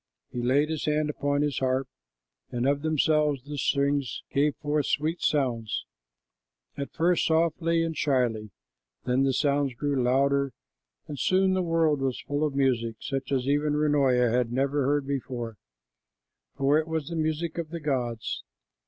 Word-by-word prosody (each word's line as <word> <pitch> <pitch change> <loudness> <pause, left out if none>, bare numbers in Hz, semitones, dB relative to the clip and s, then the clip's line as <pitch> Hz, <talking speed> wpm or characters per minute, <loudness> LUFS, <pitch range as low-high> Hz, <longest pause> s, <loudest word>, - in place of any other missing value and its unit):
He 125 - -3
laid 140 +5 +2
his 155 - -2
hand 150 0 +1
upon 145 0 0
his 145 -2 -1
harp, 130 0 0 0.6
and 120 +1 -1
of 140 0 +1
themselves 150 -3 +2
the 145 +1 -7
strings 140 -2 0
gave 145 +1 +2
forth 150 -1 -1
sweet 155 +4 0
sounds, 120 -7 0 0.9
at 140 0 -5
first 175 +1 +2
softly 165 +1 +2
and 165 -1 -2
shyly. 120 -8 0 0.5
Then 130 +2 +2
the 135 - +2
sounds 140 -1 +1
grew 140 +1 0
louder, 140 +1 +2 0.5
and 145 -3 -6
soon 190 +4 +3
the 185 - +1
world 165 -4 +2
was 135 -2 -1
full 145 +1 -2
of 150 -3 -1
music, 120 -4 +1
such 135 0 -4
as 130 -1 0
even 145 +1 +1
Runoia 135 -5 +3
had 120 -1 +1
never 135 +2 +1
heard 145 -1 +1
before, 125 -5 -4 1.0
for 140 +2 +3
it 160 - -3
was 160 -2 -3
the 170 - -4
music 160 +1 -1
of 165 -2 -4
the 170 +1 -5
gods. 125 -6 -2
140 Hz, 160 wpm, -27 LUFS, 130-150 Hz, 1.0 s, soon